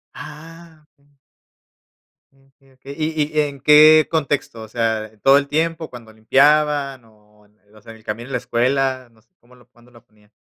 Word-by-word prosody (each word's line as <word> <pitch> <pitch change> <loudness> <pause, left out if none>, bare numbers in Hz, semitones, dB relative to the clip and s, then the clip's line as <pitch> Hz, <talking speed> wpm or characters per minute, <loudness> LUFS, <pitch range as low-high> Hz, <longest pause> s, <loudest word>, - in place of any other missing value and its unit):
Ah, 160 0 -13
m 140 0 -34 1.2
Okey, 135 0 -29
okey, 135 +2 -12
¿y 155 -1 -2
y - - +5
en 140 -2 -5
qué 155 +1 +6
contexto? 145 -7 -3
O - - -10
sea, 110 -1 -3
¿todo 135 +1 +5
el 140 - -1
tiempo, 160 +2 -2
cuando 120 -3 -12
limpiaban 140 +2 +1
o 105 -1 -26
en 105 +1 -32 0.2
o 105 - -18
sea, 115 - -13
en 110 - -14
el - - -24
camino 115 +4 -6
de - - -12
la 125 - -1
escuela, 130 +1 -1
no 110 -1 -27
sé, 115 - -41
cómo 120 +1 -24
lo 125 -1 -23
cuándo 120 0 -24
lo 115 -2 -20
ponían? 105 -1 -30
135 Hz, 190 wpm, -19 LUFS, 115-150 Hz, 1.2 s, qué